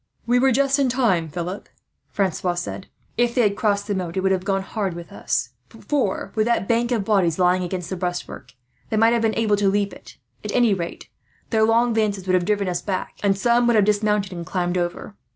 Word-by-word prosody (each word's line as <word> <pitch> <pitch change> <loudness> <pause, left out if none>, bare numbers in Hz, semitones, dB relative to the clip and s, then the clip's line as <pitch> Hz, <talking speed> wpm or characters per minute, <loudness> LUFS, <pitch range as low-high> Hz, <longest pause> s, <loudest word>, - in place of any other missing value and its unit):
"We 245 +1 +3
were 265 +1 +4
just 275 +2 +2
in 270 -2 +2
time, 215 -11 +1
Philip," 175 +5 -5 0.4
Francois 185 -2 -1
said. 175 +2 -5 0.3
"If 240 0 +1
they 250 - +4
had 205 -2 +2
crossed 200 -1 0
the 205 - -2
moat 180 -2 -4
it - - +1
would 190 0 +1
have 185 -1 0
gone 195 0 0
hard 195 -3 -3
with 170 -2 -9
us; 125 -1 -2 0.2
for, 290 +5 -2
with 215 0 +1
that 235 -5 +1
bank 235 +1 +1
of 220 -5 0
bodies 190 -7 +2
lying 180 0 +3
against 180 0 -4
the - - -1
breastwork, 175 -1 -5 0.4
they 220 - -1
might 225 +2 +5
have 235 - +1
been 225 -1 +1
able 215 -2 +2
to 200 -1 +2
leap 200 0 0
it. - - -14 0.3
At 210 - -4
any 240 -4 +4
rate, 170 -3 -5 0.4
their 220 -2 +2
long 230 +1 +3
lances 205 -4 0
would 185 - 0
have 180 -1 +2
driven 205 -1 0
us 180 -1 -1
back, 190 -3 -4
and 195 -1 +2
some 240 +3 +3
would 235 - +3
have 210 -2 +4
dismounted 210 -2 +1
and 170 -1 -5
climbed 175 +1 -2
over. 175 +3 -3
200 Hz, 225 wpm, -22 LUFS, 185-230 Hz, 0.4 s, might